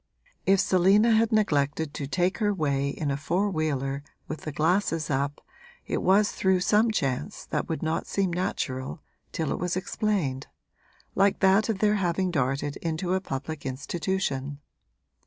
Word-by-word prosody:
If 195 0 +5
Selina 195 +4 +4
had 225 +1 +3
neglected 150 -7 +1
to 140 - -4
take 180 - 0
her 210 -2 +2
way 140 -6 0
in 145 0 -2
a 140 - -1
four 180 +8 0
wheeler 140 -4 -1 0.3
with 155 - -5
the 155 - -5
glasses 160 +1 +1
up 140 +1 -2 0.4
it - - -2
was 200 +3 +4
through 190 -1 +1
some 215 +5 +3
chance 135 - -2
that - - -3
would 160 - -2
not 160 0 -1
seem 190 -3 0
natural 135 -5 -3 0.3
till 160 -3 -2
it - - -2
was 180 +1 -1
explained, 185 -9 -1 0.7
like 200 0 +3
that 195 +3 +4
of 220 - 0
their 210 +1 +2
having 185 0 0
darted 140 -1 -1
into 170 +2 -2
a 190 - +1
public 145 -1 -5
institution. 145 0 -2
170 Hz, 155 wpm, -27 LUFS, 145-195 Hz, 0.7 s, If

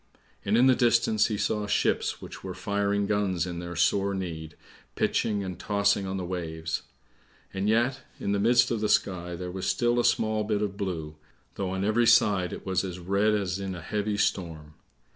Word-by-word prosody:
And 105 +3 +2
in 125 - +5
the 130 - +6
distance 115 -3 +3
he 110 -3 -2
saw 105 0 -1
ships - - 0
which - - -9
were - - -6
firing 100 0 0
guns 100 -4 0
in 85 -1 -5
their 85 0 -6
sore 100 +3 +2
need, 80 -5 -5 0.4
pitching 105 -3 0
and 90 -2 -6
tossing 100 -1 +1
on 95 0 -3
the 90 - -3
waves. 80 -3 -4 0.7
And 95 +2 -1
yet 120 +4 +2 0.2
in 100 - -2
the 100 - +1
midst 120 +4 +4
of 115 -2 -1
the 105 - 0
sky 90 -2 0
there 90 +1 -5
was 95 0 -4
still 120 -1 +2
a - - +2
small 110 -2 +1
bit 105 0 0
of 100 -2 -3
blue, 80 -6 -4 0.4
though 95 -2 -3
on 95 +1 -2
every 115 +3 +3
side 95 -5 +4
it - - -8
was 95 -1 0
as 90 -2 -5
red 100 +4 +1
as 95 -2 -2
in 95 -1 -4
a 85 - -7
heavy 105 +3 -2
storm. 80 -6 -2
100 Hz, 200 wpm, -27 LUFS, 90-105 Hz, 0.7 s, the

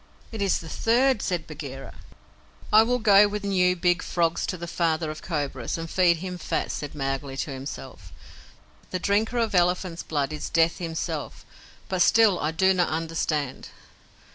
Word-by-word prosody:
"It 220 -2 -5
is 195 -2 +2
the 165 - -9
third," 240 +6 +2
said 175 -4 -2
Bagheera. 140 -3 -8 0.8
"I 215 - +9
will 245 +2 +2
go 205 -3 +6
with 205 0 -4
new, 180 -2 +2
big 175 0 +1
frogs 170 -1 0
to 185 - -3
the 170 - -6
Father 165 -2 -1
of 155 - -9
Cobras, 145 -7 -3
and 165 0 -5
feed 175 0 +3
him 180 +1 -6
fat," - - -2
said 145 0 -5
Mowgli 135 -1 -3
to 145 - -3
himself. 130 - -8 0.8
"The 185 - -2
drinker 210 +6 0
of 230 -3 0
elephant's 180 -1 +1
blood 145 -1 -2
is 150 - -5
Death 165 +2 +2
himself 165 -3 -4 0.4
but 185 -1 -1
still 215 -1 +5
I 150 - 0
do 190 +4 +3
not 180 -2 +1
understand!" 160 -4 -2
170 Hz, 165 wpm, -25 LUFS, 155-190 Hz, 0.8 s, I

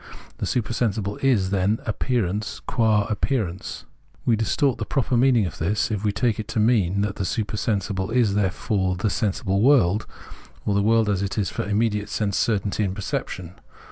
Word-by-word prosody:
The - - -2
supersensible 110 -4 -1
is 110 -9 +2
then 100 +3 +1
appearance 110 -2 -1
qua 110 -3 +2
appearance. 105 -5 -2 0.4
We 115 - +4
distort 115 +5 +1
the - - -1
proper 130 -1 0
meanmg 120 -3 +4
of 85 - -6
this, 105 +7 0
if 105 -1 -2
we 105 - +2
take 115 +1 0
it 110 - -4
to 115 -1 -2
mean 100 -4 +2
that 105 -1 -2
the - - -2
super 105 +3 -2
sensible 100 -2 -1
is 115 -3 +2
therefore 95 -1 0
the 100 +3 -1
sensible 100 -2 0
world, 110 -6 +4 0.6
or 105 - +1
the 100 - +2
world 110 +1 +3
as 100 -2 +1
it 100 +2 -3
is 100 -5 0
for - - -3
immediate 105 0 0
sense 100 -3 -1
certainty 105 -1 0
and 95 -2 -2
perception. 95 -3 -4
105 Hz, 175 wpm, -24 LUFS, 95-115 Hz, 0.6 s, We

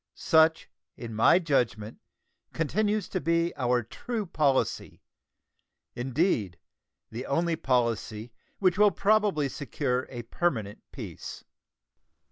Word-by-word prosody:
Such, 160 0 +3 0.3
in 115 -2 -7
my 110 +10 +5
judgment, 120 - -1 0.5
continues 210 +6 0
to 185 - -2
be 170 +1 +1
our 125 -2 +1
true 220 - -5
policy; 145 -6 0 0.9
indeed, 120 - 0 0.5
the 120 +4 -6
only 165 +3 +1
policy 115 -5 -1 0.2
which 185 -1 +2
will 210 0 +7
probably 205 -8 +2
secure 130 -2 -2
a 120 -2 -6
permanent 115 - -2
peace. - - -8
145 Hz, 100 wpm, -28 LUFS, 120-175 Hz, 0.9 s, will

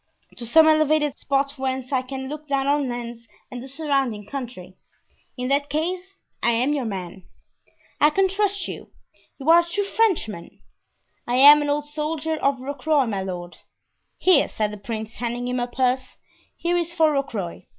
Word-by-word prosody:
"To 235 - -6
some 315 +6 +6
elevated 310 -2 +3
spot 275 0 -1
whence 260 -1 -3
I 260 -2 +2
can 265 +1 -6
look 300 +2 -7
down 275 -1 0
on 285 -1 +1
Lens 235 -1 -6 0.2
and 245 -1 -6
the 265 - -8
surrounding 270 -7 -1
country——" 235 -7 -7 0.6
"In 250 0 -3
that 285 +1 +1
case, 360 +5 -3 0.2
I'm 235 +5 +2
your 275 -4 -1
man." 190 -3 -5 0.8
"I 300 - +6
can 385 +5 +2
trust 400 +1 -1
you—you 275 - -12
are 335 +1 +8
a - - +2
true 350 +4 -2
Frenchman?" 375 - -1 0.7
"I 240 - 0
am 290 +3 +9
an 290 - -1
old 290 0 0
soldier 310 +1 -3
of 275 -2 +1
Rocroy, 280 +1 0
my 200 -3 -2
lord." 175 -2 -6 0.6
"Here," 360 -7 +4
said 210 -1 -2
the 210 - -7
prince, 220 +1 -6
handing 240 +1 -3
him 250 0 -1
a 245 - -1
purse, 255 +1 -1 0.4
"here 350 +1 0
is 340 -1 -1
for 320 -2 +3
Rocroy. 210 - -3
275 Hz, 170 wpm, -23 LUFS, 240-310 Hz, 0.8 s, am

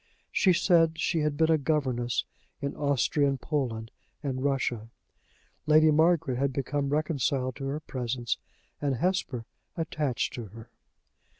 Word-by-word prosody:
She 190 - +4
said 165 -2 +4
she 165 - +1
had 150 -1 0
been 160 0 +3
a 160 - +4
governess 130 -5 0 0.3
in 140 -1 -3
Austrian 140 0 +1
Poland 120 -6 -2 0.3
and 130 -2 -2
Russia. 130 -5 -1 0.8
Lady 155 0 +6
Margaret 155 -4 +3
had 140 0 +1
become 140 +1 -1
reconciled 140 -4 0
to 135 - -5
her 140 +2 -2
presence, 125 -4 -3 0.4
and 140 -2 +1
Hesper 135 -6 -1 0.3
attached 150 -5 -1
to 120 - -5
her. 115 +3 -12
140 Hz, 130 wpm, -28 LUFS, 125-155 Hz, 0.8 s, Lady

